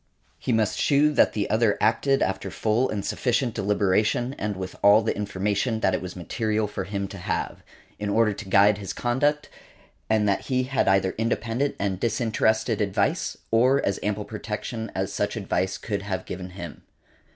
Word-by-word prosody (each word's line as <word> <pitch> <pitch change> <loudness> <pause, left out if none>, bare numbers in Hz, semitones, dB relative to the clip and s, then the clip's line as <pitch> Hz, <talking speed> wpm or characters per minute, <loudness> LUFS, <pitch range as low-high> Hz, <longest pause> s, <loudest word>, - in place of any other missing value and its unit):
He - - -2
must 110 -2 +1
shew 150 +1 +3
that - - +4
the 105 - -1
other 110 -2 +3
acted 135 +5 +2
after 95 0 -2
full 110 +7 0
and 100 -2 -3
sufficient 125 -1 0
deliberation 105 +4 +1
and 105 0 -2
with 95 -1 -6
all 105 +2 +6
the 110 - -1
information 105 +3 -1
that 95 - +2
it - - -1
was 90 -1 -7
material 110 +4 -1
for 100 -2 -4
him 100 0 -3
to 100 - -8
have, 90 -1 -3 0.4
in 105 0 -2
order 110 0 +3
to 100 -1 -9
guide 100 +2 +5
his 100 -2 -5
conduct, 145 +5 0 0.6
and 110 -1 +2
that 100 - 0
he 130 -1 +1
had 135 +1 0
either 95 -1 +3
independent 115 +4 -1
and 95 -2 -2
disinterested 110 -1 +1
advice, 100 -2 0
or 125 +5 +4
as 100 - 0
ample 105 0 -2
protection 110 +1 -5
as 95 +1 -2
such 105 +2 -1
advice 95 -3 -1
could 100 -3 -3
have 100 -2 -4
given 90 0 -6
him. 90 -3 -9
105 Hz, 175 wpm, -25 LUFS, 100-115 Hz, 0.6 s, all